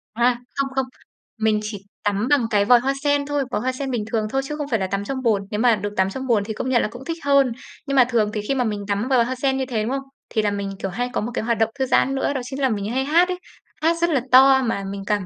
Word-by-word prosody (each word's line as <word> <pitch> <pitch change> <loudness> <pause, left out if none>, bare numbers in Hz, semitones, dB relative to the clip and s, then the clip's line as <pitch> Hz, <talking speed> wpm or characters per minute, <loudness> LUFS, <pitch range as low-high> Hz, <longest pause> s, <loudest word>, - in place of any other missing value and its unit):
À. 240 +1 +3 0.2
Không, 275 -1 -1
không. 265 -1 +1 0.5
Mình 220 -1 +2
chỉ 205 -2 -6 0.2
tắm 205 +3 0
bằng 285 -5 +3
cái 205 -2 +2
vòi 245 +1 +6
hoa 270 +3 0
sen 285 -1 +2
thôi, 290 -1 -1
vòi - - -1
hoa 255 +2 0
sen 265 +1 -4
bình 235 -4 -1
thường 215 -2 0
thôi 270 +4 0
chứ 300 +2 -4
không 295 -2 -3
phải 230 -6 0
là 190 - -1
tắm 200 +1 -2
trong 260 +4 -4
bồn. 220 -5 +2
Nếu 210 - -2
mà 240 -1 +4
được 205 0 -5
tắm 190 0 +3
trong 265 +5 -5
bồn 215 -4 +2
thì 220 +1 -4
công 250 - -3
nhận 245 -2 +3
là - - 0
cũng 245 +2 -10
thích 330 0 -3
hơn. 280 -3 +4 0.4
Nhưng 275 - -1
mà 255 - +7
thường 225 -4 +1
thì 210 - -2
khi 275 - +1
mà 255 - +1
mình 210 -3 -3
tắm 205 +3 -1
vòi 255 -3 +4
hoa 260 +2 -3
sen 265 +1 0
như 265 - -1
thế, 230 -4 -2
đúng 225 - -2
không? 270 0 -1 0.3
Thì 220 - 0
là 210 -1 0
mình, 200 -1 -3
kiểu, 195 - -3
hay 245 +6 -2
có - - 0
một 235 +3 -3
cái - - -2
hoạt 235 0 0
động 225 0 +2
thư 265 - +2
giãn 270 +1 +2
nữa, 270 +1 0
đó 265 - -2
chính 265 +2 -6
là 265 - +3
mình 205 -3 -2
hay 265 +2 0
hát 340 +5 +4
ấy. 360 0 -3 0.4
Hát 330 +2 +2
rất 340 - +3
là 275 -6 +2
to 265 +1 +7
mà 225 -5 -1
mình 200 0 -6
cảm 205 -3 0
245 Hz, 315 wpm, -22 LUFS, 210-270 Hz, 0.5 s, mà